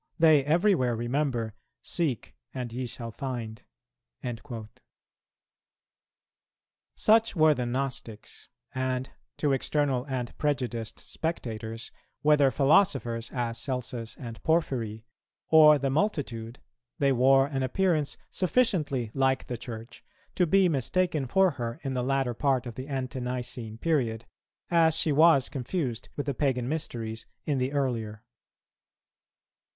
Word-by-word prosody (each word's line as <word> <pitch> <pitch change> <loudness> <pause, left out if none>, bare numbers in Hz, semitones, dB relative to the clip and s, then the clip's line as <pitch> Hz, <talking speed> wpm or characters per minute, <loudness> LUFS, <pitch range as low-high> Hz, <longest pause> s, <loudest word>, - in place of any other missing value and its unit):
They 155 -4 +6
everywhere 155 - +2
remember, 120 -2 -1 0.3
'Seek, 135 - -2 0.2
and 125 -3 -4
ye 125 +1 -3
shall 115 -1 -7
find.'"[223:4] 110 - -8 2.3
Such 225 0 +4
were 155 -2 +5
the 125 -4 -3
Gnostics; 120 -4 -5 0.2
and 130 0 -2 0.3
to 145 -2 +1
external 135 -1 0
and 125 -3 -3
prejudiced 125 -6 -2
spectators, 115 -8 -5 0.3
whether 150 -2 +5
philosophers, 135 - +2
as 120 -2 -2
Celsus 125 -3 -4
and 115 -3 -8
Porphyry, 120 -9 0 0.4
or 155 -1 +8
the 135 -1 -1
multitude, 135 - -1 0.4
they 140 -1 +3
wore 135 +1 +5
an 135 -1 -3
appearance 155 +2 +1
sufficiently 170 - +1
like 135 -1 +1
the 125 - -4
Church 115 0 -8 0.3
to 180 - +2
be 195 +2 +5
mistaken 155 0 0
for 190 +7 +4
her 115 -4 -5
in 135 -2 -2
the 125 - -1
latter 135 -1 0
part 130 0 +1
of 120 - -6
the 130 +4 -7
Ante 130 -2 -3
nicene 120 -3 -4
period, 120 -7 0 0.5
as 165 -2 +4
she 160 - +2
was 150 -2 +5
confused 130 -3 -3
with 145 - -3
the 140 - -1
Pagan 125 -3 0
mysteries 115 -7 -4 0.2
in 145 -3 0
the 130 +1 0
earlier. 115 -6 -2
130 Hz, 120 wpm, -28 LUFS, 120-150 Hz, 2.3 s, or